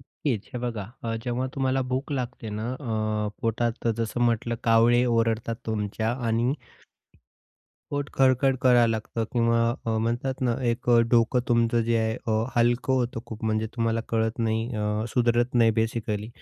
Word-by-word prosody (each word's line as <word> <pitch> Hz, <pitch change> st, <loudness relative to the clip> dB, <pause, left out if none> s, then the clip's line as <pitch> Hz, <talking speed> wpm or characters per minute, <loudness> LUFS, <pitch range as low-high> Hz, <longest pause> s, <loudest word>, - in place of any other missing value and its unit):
नक्कीच, 125 Hz, -4 st, -3 dB
हे -, -, -2 dB
बघा 120 Hz, -3 st, -3 dB, 0.2 s
अ, 115 Hz, 0 st, -1 dB
जेव्हा 125 Hz, +1 st, -1 dB
तुम्हाला 135 Hz, -1 st, +1 dB
भूक 135 Hz, +3 st, -2 dB
लागते 125 Hz, -3 st, -4 dB
ना, 115 Hz, +3 st, -3 dB
अ, 110 Hz, -5 st, -2 dB
पोटात 115 Hz, +1 st, -1 dB
जसं 115 Hz, +1 st, -2 dB
म्हटलं 115 Hz, 0 st, +1 dB
कावळे 115 Hz, +2 st, +5 dB
ओरडतात 115 Hz, 0 st, 0 dB
तुमच्या 110 Hz, +1 st, -1 dB
आणि 115 Hz, +3 st, +1 dB, 1.4 s
पोट 145 Hz, -1 st, -2 dB
खडखड 130 Hz, 0 st, +3 dB
करायला 120 Hz, -2 st, +5 dB
लागतं 115 Hz, 0 st, -2 dB
किंवा 115 Hz, -1 st, +2 dB, 0.3 s
अ, -, -, +1 dB
म्हणतात 120 Hz, +4 st, -2 dB
ना, 120 Hz, -2 st, +2 dB, 0.2 s
एक 120 Hz, +2 st, -4 dB
अ, 120 Hz, -, +6 dB
डोकं 120 Hz, +1 st, +3 dB
तुमचं 115 Hz, 0 st, +3 dB
जे 115 Hz, 0 st, +1 dB
आहे 110 Hz, +1 st, 0 dB
अ, 110 Hz, 0 st, +1 dB
हलकं 120 Hz, +2 st, +2 dB
होतं, 120 Hz, -3 st, 0 dB
खूप 110 Hz, -1 st, -7 dB
म्हणजे 110 Hz, 0 st, 0 dB
तुम्हाला 115 Hz, -1 st, +1 dB
कळत 110 Hz, 0 st, 0 dB
नाही 115 Hz, 0 st, 0 dB
अ, 105 Hz, +1 st, -1 dB
सुधरत 120 Hz, +1 st, +1 dB
नाही 115 Hz, -2 st, +5 dB
बेसिकली. 110 Hz, -1 st, -1 dB
115 Hz, 155 wpm, -26 LUFS, 110-125 Hz, 1.4 s, अ